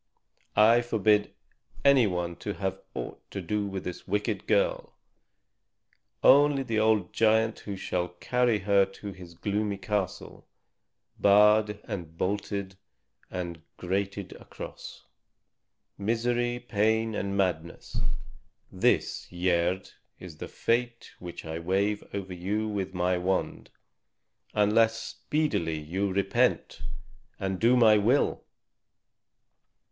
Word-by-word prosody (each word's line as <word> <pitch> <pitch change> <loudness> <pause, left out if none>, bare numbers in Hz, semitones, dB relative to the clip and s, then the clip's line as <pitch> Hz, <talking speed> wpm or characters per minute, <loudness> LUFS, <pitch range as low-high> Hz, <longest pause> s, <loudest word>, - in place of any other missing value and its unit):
I 115 +3 +6
forbid 105 -3 +2 0.5
any 135 -5 +6
one 90 -2 -2
to 105 - -5
have 95 -1 -3
aught - - -6
to - - -5
do 105 -1 -2
with 95 -1 -5
this 90 - -7
wicked 105 0 -1
girl, - - +1 1.3
only 140 0 +6
the 115 -4 -1
old 110 -4 +2
giant 110 0 +3
who 100 - -6
shall 90 -1 -2
carry 120 +6 +1
her 100 0 +3
to 95 +1 -7
his 90 -2 -12
gloomy 100 +3 -1
castle, 95 -1 -4 0.7
barred 105 +1 +5
and 85 -4 -7
bolted 100 0 -2 0.5
and 85 -3 -5 0.2
grated 100 +1 -2
across. - - -10 0.9
Misery, 120 +3 0
pain, 110 -1 +1
and 100 -1 -2
madness 85 -3 -2 0.7
this, - - +1
Gerd, 90 +1 0 0.3
is 85 -4 -10
the - - -6
fate 120 0 -1
which 90 -2 -8
I 80 +1 -4
wave 100 +4 0
over 95 -2 -5
you 100 +5 -2
with 95 -3 -3
my 90 0 +1
wand, 95 +1 -2 0.9
unless 110 +2 +3
speedily 115 - -1
you 95 +6 -2
repent 95 +1 +1 0.6
and 95 -1 -2
do 120 +2 +4
my 110 -3 +6
will." 120 +8 +2
100 Hz, 110 wpm, -28 LUFS, 95-110 Hz, 1.3 s, I